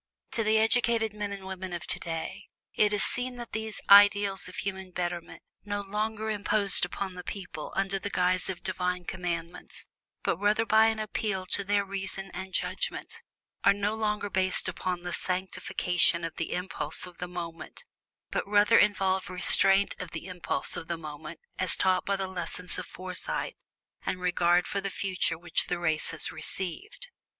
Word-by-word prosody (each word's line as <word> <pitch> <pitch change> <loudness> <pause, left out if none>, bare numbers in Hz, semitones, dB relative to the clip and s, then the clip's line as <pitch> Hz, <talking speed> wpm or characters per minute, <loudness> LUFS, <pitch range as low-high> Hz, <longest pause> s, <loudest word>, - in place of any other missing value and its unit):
To 230 - 0
the 215 +1 +3
educated 225 -1 +2
men 210 -1 -4
and 195 -1 -7
women 190 -1 -6
of 175 - -5
today, 170 +4 -4 0.3
it 210 -1 +3
is 205 -1 +3
seen 250 +1 +2
that 240 -1 -8
these 220 -1 -3
ideals 200 -1 +6
of 185 - -10
human 190 -1 -4
betterment 175 -1 -5 0.2
(no 205 0 -3
longer 215 +2 -3
imposed 205 -2 +4
upon 190 +2 -5
the 180 0 -8
people 180 -7 -7
under 195 0 0
the 205 - -4
guise 180 -1 +2
of 185 -2 -5
Divine 180 -1 -2
Commands, 170 -2 -5 0.4
but - - 0
rather 210 +3 +2
by 220 0 +5
an 225 0 0
appeal 215 -3 -2
to 200 - +4
their 200 0 +1
reason 195 -1 -2
and 190 +1 -6
judgment) - - -3 0.4
are - - +6
no 205 +1 -1
longer 210 -2 -2
based 185 0 +2
upon 180 -1 -3
the 175 -1 -4
sanctification 180 -2 +1
of 165 -1 -4
the 165 - -3
impulse 180 +1 -2
of 180 -2 -13
the 180 - -4
moment, 170 -2 -8 0.5
but - - -2
rather 210 +2 +5
involve 190 -2 +2
restraint 195 +2 +6
of 180 - -6
the 165 - -6
impulse 180 -2 -1
of 165 - -6
the 170 - -3
moment 150 -2 -9 0.2
as - - +3
taught 185 -1 +1
by 200 - +2
the 195 0 -2
lessons 180 -1 -3
of - - -7
foresight 185 - -3 0.5
and 185 - -2
regard 175 0 +2
for 200 - -2
the 195 - -3
future 185 -4 -1
which 170 0 -2
the 175 - -1
race 160 -2 +2
has 165 - 0
received. 425 - -1
190 Hz, 175 wpm, -28 LUFS, 180-205 Hz, 0.5 s, ideals